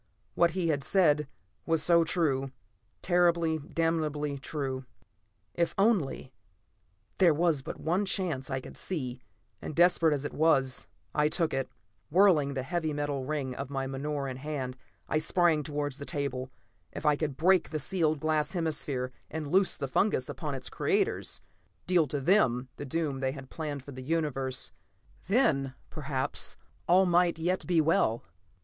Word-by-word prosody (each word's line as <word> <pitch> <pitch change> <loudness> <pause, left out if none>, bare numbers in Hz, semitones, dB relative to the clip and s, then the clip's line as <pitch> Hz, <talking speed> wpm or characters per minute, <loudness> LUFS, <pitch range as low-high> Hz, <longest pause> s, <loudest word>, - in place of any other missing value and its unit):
What 170 -1 +3
he 170 -3 +1
had 145 -3 0
said 150 -6 +3 0.4
was 165 -1 +2
so 170 -1 +5
true; 140 -6 0 0.5
terribly, 170 -3 +3
damnably 150 -2 -1
true. 135 -2 -3 0.7
If 170 -1 0
only 185 - +1 0.9
There 175 -5 +6
was 165 -3 +2
but - - -7
one 185 +5 0
chance 165 -9 -1
I 130 0 -2
could - - -11
see, 130 -8 -3 0.4
and 155 - -6
desperate 170 -2 +5
as 145 0 -5
it - - -4
was, 140 -5 +2 0.3
I 150 0 +3
took 160 0 +1
it. 135 -1 -1 0.4
Whirling 155 -6 +4
the 130 - -2
heavy 160 +2 -2
metal 145 -2 -2
ring 140 -3 -2
of 135 +1 -5
my 135 -1 -2
menore 140 +1 -3
in 130 -1 -5
my - - -12
hand, 135 -4 -4 0.3
I 155 - +1
sprang 165 -1 +3
towards 145 -1 -3
the - - -5
table. 130 -3 -3 0.4
If - - -7
I 150 -1 +5
could 145 -3 -3
break 185 +1 +4
the 155 - -2
sealed 155 0 0
glass 155 +1 0
hemisphere, 145 -7 -2 0.2
and 150 -2 -5
loose 190 +1 +3
the 140 - -3
fungus 130 -1 +1
upon 150 -4 -4
its 130 - -6
creators; - - 0 0.4
deal 175 -4 +3
to 145 +2 -2
them 130 - +3
the 145 - -5
doom 145 -1 -2
they 130 0 -1
had 135 -2 -10
planned 145 -4 -4
for 140 - -10
the 130 -1 -8
universe, 135 -3 -1 0.6
then 140 - +2 0.2
perhaps 140 -2 -2 0.3
all 185 +2 +6
might 175 -1 +3
yet 175 +3 -1
be 175 -2 +3
well. 150 -7 +2
150 Hz, 160 wpm, -29 LUFS, 135-170 Hz, 0.9 s, There